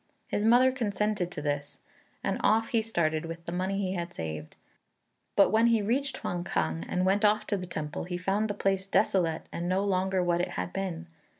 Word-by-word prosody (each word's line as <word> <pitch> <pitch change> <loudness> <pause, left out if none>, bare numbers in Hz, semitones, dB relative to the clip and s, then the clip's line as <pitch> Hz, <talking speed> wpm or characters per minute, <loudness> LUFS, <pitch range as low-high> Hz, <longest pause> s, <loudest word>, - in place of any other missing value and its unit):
His 205 - 0
mother 245 +4 +6
consented 210 -6 -1
to 150 - -6
this, 145 -1 -2 0.5
and - - -1
off 225 +1 +3
he 230 -4 +2
started 165 -8 0
with 165 0 -7
the - - -4
money 185 +2 -1
he 190 -2 -1
had 175 -1 -4
saved; 80 -1 -5 0.8
but 200 - +5
when 225 +2 +5
he 230 -3 +3
reached 260 +5 0
Huang 175 -1 -3
kang 80 - -1
and 180 0 +1
went 195 +3 +2
off 210 0 +3
to 205 - 0
the 180 -1 -6
temple, 155 -3 -4
he 180 0 -3
found 195 +4 0
the 205 - -2
place 195 -1 0
desolate 175 -4 +1
and 175 +1 -3
no 190 +2 +1
longer 190 -1 +1
what 175 0 +2
it - - 0
had 175 - -3
been. 180 -4 -3
185 Hz, 205 wpm, -29 LUFS, 170-210 Hz, 0.8 s, mother